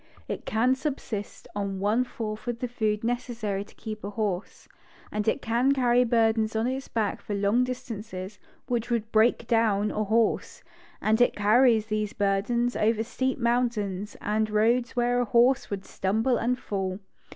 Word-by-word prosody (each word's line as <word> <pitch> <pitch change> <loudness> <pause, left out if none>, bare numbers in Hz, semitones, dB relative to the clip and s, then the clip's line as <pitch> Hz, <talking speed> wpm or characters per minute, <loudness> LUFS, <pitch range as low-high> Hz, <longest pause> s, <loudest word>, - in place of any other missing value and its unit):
It - - -5
can 235 +4 +3
subsist 260 -7 -4
on 200 -2 -2
one 210 +5 +2
fourth 215 -3 -6
the 250 - -3
food 215 -3 -1
necessary 235 -4 -2
to 205 - -20
keep 215 -1 -7
a 200 - -3
horse, 205 -3 -3 0.4
and 210 0 -2
it 250 - +1
can 240 +4 +2
carry 250 -2 +3
burdens 225 -2 +2
on 220 +1 +1
its 265 +2 -2
back 215 -3 -1
for 205 - -4
long 205 +5 +2
distances 215 -6 -6 0.3
which 240 -2 -2
would 230 -2 -1
break 225 +2 +3
down 215 -3 +2
a 215 - -1
horse; 220 +2 0 0.4
and 220 +2 +3
it 245 - +4
carries 220 +2 +4
these 215 -1 -2
burdens 215 +5 0
over 220 +1 +2
steep 260 +2 -2
mountains, 230 -5 -1
and 215 +1 0
roads 235 +4 +2
where 245 0 +2
a - - 0
horse 245 +3 +3
would 195 -2 -4
stumble 220 +6 0
and 245 +2 0
fall. 190 -5 -3
225 Hz, 160 wpm, -27 LUFS, 210-245 Hz, 0.4 s, it